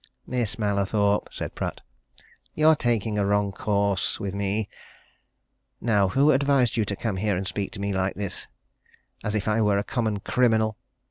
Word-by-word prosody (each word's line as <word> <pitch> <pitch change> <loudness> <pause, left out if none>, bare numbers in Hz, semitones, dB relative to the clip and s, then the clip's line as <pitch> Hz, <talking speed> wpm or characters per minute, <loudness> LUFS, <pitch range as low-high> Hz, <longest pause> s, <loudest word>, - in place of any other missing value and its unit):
"Miss 120 -5 -2
Mallathorpe," 100 -1 +1
said - - -5
Pratt. - - -4 0.8
"You're 155 +1 +5
taking 115 -5 0
a 100 - +2
wrong 100 0 +2
course 100 -1 0
with 100 -1 -3
me. 100 +1 -1 1.1
Now 105 -4 +2
who 140 +10 +4
advised 140 -3 +3
you 110 - +1
to 100 - -2
come 105 -2 -3
here 100 -1 0
and 95 - -3
speak 100 +1 -3
to 105 - -8
me 100 0 -1
like 95 0 0
this, 100 -3 -3 0.8
as 105 - -2
if 105 - -1
I 110 +1 +2
were 105 -2 +3
a 100 - 0
common 110 -3 -1
criminal? 110 -1 +2
105 Hz, 165 wpm, -25 LUFS, 100-115 Hz, 1.1 s, You're